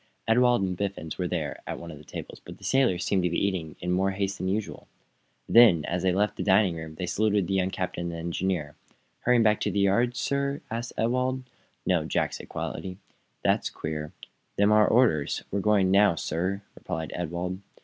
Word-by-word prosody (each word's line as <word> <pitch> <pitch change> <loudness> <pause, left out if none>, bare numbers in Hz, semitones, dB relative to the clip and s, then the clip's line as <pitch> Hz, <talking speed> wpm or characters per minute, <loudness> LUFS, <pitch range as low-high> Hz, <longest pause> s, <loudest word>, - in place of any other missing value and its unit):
Ewald 120 -1 +4
and 90 -1 -1
Biffens 95 -4 -4
were 90 - 0
there, 80 -5 -3
at - - -4
one 85 0 -8
of 75 - -10
the - - -14
tables, - - -8
but - - -10
the - - -19
sailors 130 -10 +2
seemed 95 - +2
to 90 - +1
be 85 - -1
eating 90 -6 -1
in 90 0 -2
more 95 +2 +2
haste 95 0 -2
than 95 - -2
usual. 100 +2 -3 0.6
Then, 110 -10 +6
as 90 +1 -2
they 95 0 +2
left 100 +3 0
the - - -2
dining 95 -2 +4
room, 80 -1 -7
they 90 - -3
saluted 100 +2 +1
the 95 - -2
young 95 -1 +1
captain 90 -2 -3
and - - -6
engineer. 85 -2 -2 0.4
"Hurrying 125 -1 +3
back 105 -1 +3
to - - 0
the 100 - -3
yard, 115 +5 +2
sir?" 140 +4 -1
asked 115 +2 -4
Ewald. 130 +3 0 0.4
"No," - - +2
said - - -7
Jack, - - 0
quietly. 90 -1 -5 0.5
"That's - - +2
queer. 75 -1 -5 0.4
Them's 100 +1 +3
our 105 0 +6
orders. 110 - +2
We're 100 - 0
going 100 -2 +3
now, 100 -2 +5
sir," 90 +6 -2
replied 80 -1 -5
Ewald. 90 +2 -3
95 Hz, 200 wpm, -27 LUFS, 85-110 Hz, 0.6 s, Then